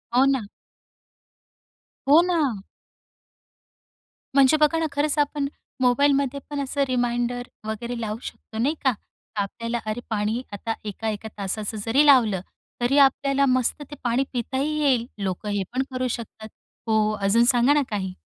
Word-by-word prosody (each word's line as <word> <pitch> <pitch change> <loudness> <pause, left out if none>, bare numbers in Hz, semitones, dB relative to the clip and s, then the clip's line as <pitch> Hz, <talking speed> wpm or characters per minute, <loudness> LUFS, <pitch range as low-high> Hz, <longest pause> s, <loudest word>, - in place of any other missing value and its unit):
हो 260 - +6
ना. 275 -2 +2 1.7
हो 315 +4 +8
ना. 305 - 0 1.7
म्हणजे 275 +2 +6
बघा 305 +2 +3
ना, 325 - 0
खरंच 290 +1 0
आपण 290 -1 0 0.3
मोबाईलमध्ये 280 +2 +3
पण 290 -1 -3
असं 280 +1 -1
रिमाइंडर 245 0 -1 0.2
वगैरे 235 +2 -4
लावू 215 -1 -3
शकतो 220 - -9
नाही 275 +8 +1
का? 265 -2 +3 0.4
आपल्याला, 230 +4 -2
अरे 215 +2 -2
पाणी 220 +2 -1
आता 225 +3 -3
1-1 215 +1 -4
तासाचं 205 +2 -3
जरी 270 +6 +4
लावलं, 230 -10 +5 0.4
तरी 250 +4 +2
आपल्याला 275 0 +4
मस्त 255 +2 +1
ते - - -6
पाणी 245 +2 +2
पिताही 265 +5 -1
येईल, 255 -5 +2 0.2
लोकं 195 +2 -3
हे 205 -1 0
पण 260 +1 +1
करू 255 0 -1
शकतात. 220 -2 -6 0.4
हो, 215 -1 +2
अजून 215 +4 +4
सांगा 245 +2 +4
ना 295 - +3
काही? 190 -3 -3
245 Hz, 140 wpm, -24 LUFS, 220-280 Hz, 1.7 s, हो